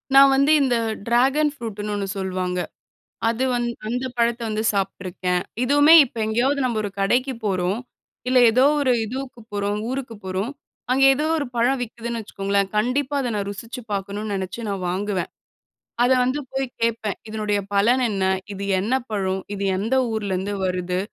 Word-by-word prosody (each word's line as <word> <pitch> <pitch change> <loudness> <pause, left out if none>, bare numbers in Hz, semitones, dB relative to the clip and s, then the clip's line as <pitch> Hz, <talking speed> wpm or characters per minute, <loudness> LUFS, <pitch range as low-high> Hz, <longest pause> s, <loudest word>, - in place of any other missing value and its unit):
நா - - +10 0.2
வந்து, 275 +3 +4
இந்த 260 -3 +2 0.3
டிராகன் 270 +6 +3
ஃப்ரூட்டுன்னு 210 -5 -5
ஒண்ணு 200 -1 -2
சொல்வாங்க. 185 -1 -2 0.7
அது 230 +3 0
வந் 240 0 0 0.2
அந்த 250 +3 -2
பழத்த 235 0 +2
வந்து 215 0 -1
சாப்ட்டுருக்கேன். 185 -2 -2 0.2
இதுவுமே, 290 +4 +6
இப்ப 240 - -13
எங்கேயாவது 260 +6 +1
நம்ப 235 -3 0
ஒரு 200 - -3
கடைக்கு 250 +7 +1
போறோம், 190 +1 0 0.5
இல்ல 255 - +4
ஏதோ 255 +4 +4 0.2
ஒரு 260 -3 +3
இதுவுக்கு 255 +2 -6
போறோம். 205 0 -1
ஊருக்கு 260 -3 -4
போறோம். 190 +5 -2 0.4
அங்கே 270 +1 +5
ஏதோ 295 +3 -1
ஒரு 285 - -2
பழம் 250 +3 +2
விக்குதுன்னு 235 0 -5
வச்சுக்கோங்களேன். 200 -1 -1
கண்டிப்பா, 260 +6 0
அதை 245 - -1
நா 205 - 0
ருசிச்சு 230 +5 -7
பார்க்கணும்ன்னு 200 +2 -3
நெனைச்சு 190 +4 -4
நா 200 - -1
வாங்குவேன். 190 0 -2 0.7
அத 245 - +3
வந்து 255 +4 0
போய் 270 0 -1 0.2
கேட்பேன். 225 -3 0
"இதனுடைய 210 -1 -1
பலன் 235 +6 +3
என்ன? 195 -2 -1 0.3
இது 200 0 -6 0.2
என்ன 220 +7 -1 0.2
பழம்? 190 -2 -1
இது 200 0 -4
எந்த 225 +7 0 0.2
ஊர்லேருந்து 200 -2 -2
வருது?" 180 0 -1
220 Hz, 155 wpm, -23 LUFS, 195-255 Hz, 0.7 s, நா